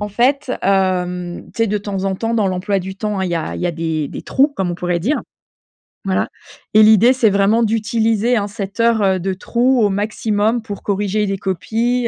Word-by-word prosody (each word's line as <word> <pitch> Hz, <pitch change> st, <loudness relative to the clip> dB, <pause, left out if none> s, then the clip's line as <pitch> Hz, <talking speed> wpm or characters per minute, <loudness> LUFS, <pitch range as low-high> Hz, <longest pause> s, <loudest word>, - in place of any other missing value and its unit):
en 210 Hz, -, -3 dB
fait, 255 Hz, +6 st, +1 dB
hem, 180 Hz, -2 st, 0 dB
tu 230 Hz, -, +1 dB
sais, -, -, -1 dB
de 210 Hz, 0 st, -1 dB
temps 195 Hz, -2 st, -4 dB
en 195 Hz, -1 st, 0 dB
temps, 225 Hz, +4 st, -2 dB
dans 210 Hz, -3 st, +2 dB
l'emploi 190 Hz, +2 st, -1 dB
du 190 Hz, +1 st, -6 dB
temps 210 Hz, -1 st, -2 dB
hein, 190 Hz, -, 0 dB
il 180 Hz, -, -3 dB
y -, -, 0 dB
a 165 Hz, -, -3 dB
il -, -, -6 dB
y 180 Hz, -, 0 dB
a -, -, +1 dB
des 160 Hz, -3 st, -2 dB
des -, -, -7 dB
trous 275 Hz, +2 st, +2 dB
comme 185 Hz, -2 st, -1 dB
on 175 Hz, -, -3 dB
pourrait 175 Hz, 0 st, -2 dB
dire. 265 Hz, -, 0 dB, 0.9 s
Voilà 190 Hz, -1 st, 0 dB, 0.4 s
et 215 Hz, -, +7 dB
l'idée 220 Hz, +3 st, +6 dB
c'est 245 Hz, -4 st, +3 dB
vraiment 200 Hz, +3 st, +3 dB
d'utiliser 225 Hz, +1 st, +1 dB
hein 205 Hz, -3 st, 0 dB
cette 200 Hz, 0 st, -7 dB
heure, 230 Hz, -2 st, +3 dB
heu, 190 Hz, -1 st, +2 dB
de 190 Hz, +2 st, -2 dB
trou 245 Hz, +6 st, +1 dB
au 205 Hz, -, +3 dB
maximum 215 Hz, +2 st, 0 dB
pour 205 Hz, -3 st, -7 dB
corriger 205 Hz, +1 st, 0 dB
les 195 Hz, 0 st, -2 dB
copies, 230 Hz, +7 st, -1 dB
205 Hz, 225 wpm, -18 LUFS, 190-225 Hz, 0.9 s, et